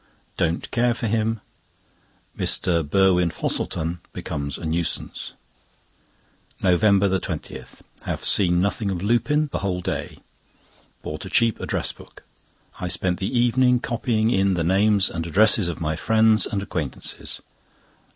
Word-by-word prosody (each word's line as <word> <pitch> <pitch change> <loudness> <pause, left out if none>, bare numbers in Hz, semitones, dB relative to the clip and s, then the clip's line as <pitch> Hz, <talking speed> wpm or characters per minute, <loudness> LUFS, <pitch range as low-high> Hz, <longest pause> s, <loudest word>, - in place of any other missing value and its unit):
Don't 85 0 -1
care 120 -1 +2
for 120 - -4
him. 110 0 0 0.9
Mr. 85 -2 +1
Burwin 90 +2 +3
Fosselton 85 +1 -2
becomes 70 -1 -4
a - - -7
nuisance. 80 +1 -2 1.3
NOVEMBER 95 +1 +3
20.—Have - - -7
seen 90 -3 +4
nothing 100 +2 0
of 95 -2 -3
Lupin 145 +8 +1
the - - -2
whole 95 -2 -2
day. - - -4 0.9
Bought 75 +3 -6
a - - -7
cheap 115 +2 +2
address - - -2
book. - - -16 0.6
I 90 - -3
spent 90 0 0
the 95 - -1
evening 125 +1 +3
copying 115 -2 0
in 95 -2 +2
the 85 - 0
names 100 +3 +3
and 80 0 -4
addresses 105 +2 +4
of 85 - -4
my 80 -1 -1
friends 110 +4 +3
and 100 -3 -3
acquaintances. 80 -9 -4
95 Hz, 130 wpm, -23 LUFS, 85-110 Hz, 1.3 s, seen